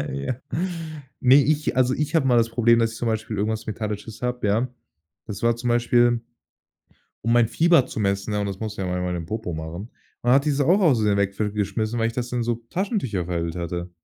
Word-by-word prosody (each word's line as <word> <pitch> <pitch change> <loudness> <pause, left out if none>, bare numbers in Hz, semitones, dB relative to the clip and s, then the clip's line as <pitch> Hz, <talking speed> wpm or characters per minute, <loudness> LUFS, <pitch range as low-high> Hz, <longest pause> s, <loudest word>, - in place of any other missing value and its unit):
Ja. 70 - -2 0.9
Ne, 130 +1 +6
ich 150 -2 0
also 130 0 +3
ich 150 +2 -2
habe 155 -5 +3
mal 125 -2 +4
das 115 0 +2
Problem, 115 0 +4
dass 115 -1 +1
ich - - -9
zum 120 - -1
Beispiel 110 -1 -2
irgendwas 110 +2 -2
Metallisches 105 +1 -5
habe, 125 -2 -1
ja. 110 +5 +1 0.6
Das 100 -3 -7
war 115 0 +3
zum 120 +1 -3
Beispiel, 120 0 +3 1.0
um 115 - +1
mein 120 -2 +4
Fieber 165 +2 +4
zu - - -5
messen, 100 +1 -1
ja, 105 - 0
und 100 - -1
das 95 -1 -5
musst 110 -1 -4
du - - -2
ja 95 - -2
manchmal 90 0 -2
im 85 -2 -5
Popo 110 -1 -4
machen. 80 +7 -6 0.3
Und 120 - +2
hat 135 +1 +5
diese 145 -2 +1
auch 185 +6 +4
ausversehen 110 - +3
weg 100 -1 0
f 105 -1 -1
geschmissen, 110 +3 -1
weil 115 0 +2
ich 115 - -5
das 125 0 -3
dann 125 -1 -1
so 120 0 0
in 115 0 -15
Taschentücher 175 - -1
verhüllt 85 -1 -3
hatte. 85 +1 -4
115 Hz, 225 wpm, -24 LUFS, 100-125 Hz, 1.0 s, Ne